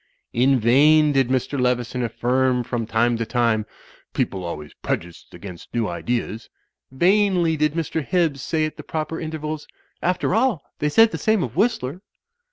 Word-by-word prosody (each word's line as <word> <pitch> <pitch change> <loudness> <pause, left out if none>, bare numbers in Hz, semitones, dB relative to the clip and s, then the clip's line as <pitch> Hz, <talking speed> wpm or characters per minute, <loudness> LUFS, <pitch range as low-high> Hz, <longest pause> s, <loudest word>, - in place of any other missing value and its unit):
In 130 +2 +3
vain 150 +6 +5
did 135 -3 +2
Mr. 130 +1 -1
Leveson 125 0 0
affirm 125 +2 +1
from 115 -2 -3
time 115 +1 +2
to 115 - -1
time, 115 -3 +1 0.5
"People 95 -1 -1
always 75 -3 -6
prejudiced 85 0 -5
against 90 -4 -10
new 115 -2 +1
ideas." 115 +4 -3 0.4
Vainly 180 +2 +2
did 150 -1 +1
Mr. 160 -1 -2
Hibbs 165 -5 0
say 155 +3 0
at 155 - -6
the - - -8
proper 160 +1 -4
intervals, 155 -1 -5 0.3
"After 180 0 0
all, 225 - +1 0.2
they 150 - +1
said 225 +8 +5
the - - -4
same 220 -3 +2
of 120 0 -5
Whistler." 185 - 0
135 Hz, 160 wpm, -22 LUFS, 120-160 Hz, 0.5 s, vain